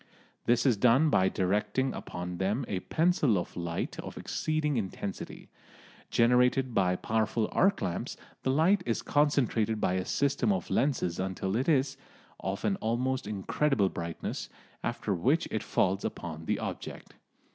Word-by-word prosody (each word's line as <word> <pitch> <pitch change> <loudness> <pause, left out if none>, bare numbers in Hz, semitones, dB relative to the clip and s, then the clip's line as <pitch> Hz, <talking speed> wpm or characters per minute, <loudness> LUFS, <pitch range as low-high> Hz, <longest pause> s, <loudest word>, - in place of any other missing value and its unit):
This 120 0 +3
is 125 -6 +4
done 130 +8 +4
by 95 -5 +4
directing 105 +8 0
upon 90 0 -6
them 105 +7 0
a 95 - -2
pencil 155 - +2
of 85 - -4
light 85 -1 -3
of - - -7
exceeding 155 -2 -1
intensity. 100 -2 -5 0.6
Generated 125 +2 +3
by 90 -3 +2
powerful 110 +2 0
arc 195 +1 +3
lamps, 90 -3 -3 0.2
the - - -1
light 165 +8 +4
is 115 - 0
concentrated 125 -7 +2
by 90 - +1
a 95 0 -1
system 140 +8 +1
of 190 - -2
lenses 120 -10 +1
until 95 +1 -2
it 130 +7 +1
is 135 -2 +2 0.4
of 95 +1 -3
an 195 - +1
almost 125 - -1
incredible 105 +2 +1
brightness, 85 -2 -5 0.3
after 120 -3 -1
which 130 - +2
it 110 - -1
falls 95 +1 +1
upon 80 -2 -5
the - - 0
object. - - -6
115 Hz, 145 wpm, -30 LUFS, 95-135 Hz, 0.6 s, is